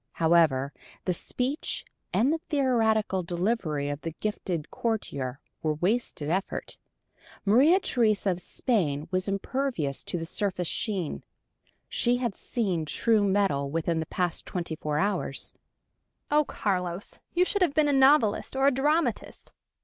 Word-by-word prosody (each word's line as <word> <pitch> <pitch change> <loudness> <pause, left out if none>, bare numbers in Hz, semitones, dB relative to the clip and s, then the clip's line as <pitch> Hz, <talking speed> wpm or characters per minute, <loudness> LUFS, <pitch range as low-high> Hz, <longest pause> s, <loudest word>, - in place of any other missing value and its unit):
However, 160 -5 +3 0.3
the 180 - +1
speech 255 - -2 0.3
and 265 +7 +3
the 325 - -1
theatrical 225 - +2
delivery 175 -4 -1
of 145 +1 -4
the 165 -1 -5
gifted 180 -7 -3
courtier 140 - -2 0.2
were 155 -1 0
wasted 180 -3 -1
effort. 185 +5 -2 0.7
Maria 275 - +6
Theresa 215 - +2
of 180 0 -3
Spain 165 - 0
was 185 +1 0
impervious 200 - -2
to - - -2
the 165 - -3
surface 180 -1 -1
sheen: 190 -7 -2 0.6
she 245 0 +2
had 240 -4 -1
seen 190 -8 -2
true 215 +8 +2
metal 190 -9 +1
within 165 +2 0
the 160 - -3
past 180 -2 -1
twenty 170 -3 -3
four 150 -1 -2
hours! 200 +5 0 0.8
"Oh, 300 0 +4
Carlos 180 -4 -3 0.2
you 360 +1 +4
should 405 +2 -1
have 345 -6 +3
been 310 -1 +4
a 290 - +2
novelist 265 -5 +4
or 270 +1 +2
a 280 - +6
dramatist! 295 +5 0
195 Hz, 140 wpm, -27 LUFS, 165-245 Hz, 0.8 s, Maria